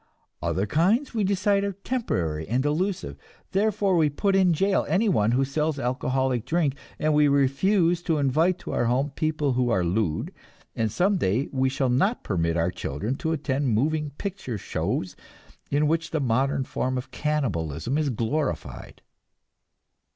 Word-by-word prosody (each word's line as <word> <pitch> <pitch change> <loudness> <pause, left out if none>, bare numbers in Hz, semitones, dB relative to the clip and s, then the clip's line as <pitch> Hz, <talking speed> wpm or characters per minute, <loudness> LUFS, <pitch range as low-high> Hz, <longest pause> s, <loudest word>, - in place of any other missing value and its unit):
Other 95 - 0
kinds 195 - +1
we 220 -3 0
decide 200 +1 +2
are 200 0 -1
temporary 90 - -2
and 125 +4 0
delusive; 180 +6 -1 0.3
therefore 200 -1 +1
we 160 -3 +4
put 195 +7 0
in 190 -2 +4
jail 195 +4 +2
anyone 180 - +2
who 135 +2 +2
sells 150 +2 -1
alcoholic 130 -1 0
drink, 150 0 0 0.2
and 155 0 +1
we 150 0 +5
refuse 165 +6 +2
to 165 -3 0
invite 155 +6 +2
to - - -6
our - - 0
home 130 +5 +1
people 155 -2 0
who 125 -1 +1
are 95 -6 +2
lewd, 85 -2 -1 0.4
and 110 -2 0
some 195 - +2
day 115 - 0
we 130 -1 +1
shall 135 -1 0
not 195 - +1
permit 85 -3 0
our 85 +2 +1
children 85 - -3
to 160 0 -2
attend 140 -3 -1
moving 150 +5 0
picture 190 - -4
shows - - -3 0.5
in 150 +2 +2
which 165 +1 0
the 155 - -1
modern 135 +2 +1
form 130 0 -2
of 125 - -6
cannibalism 115 - -1
is 150 -2 0
glorified. 130 +5 -3
145 Hz, 160 wpm, -25 LUFS, 125-175 Hz, 0.5 s, we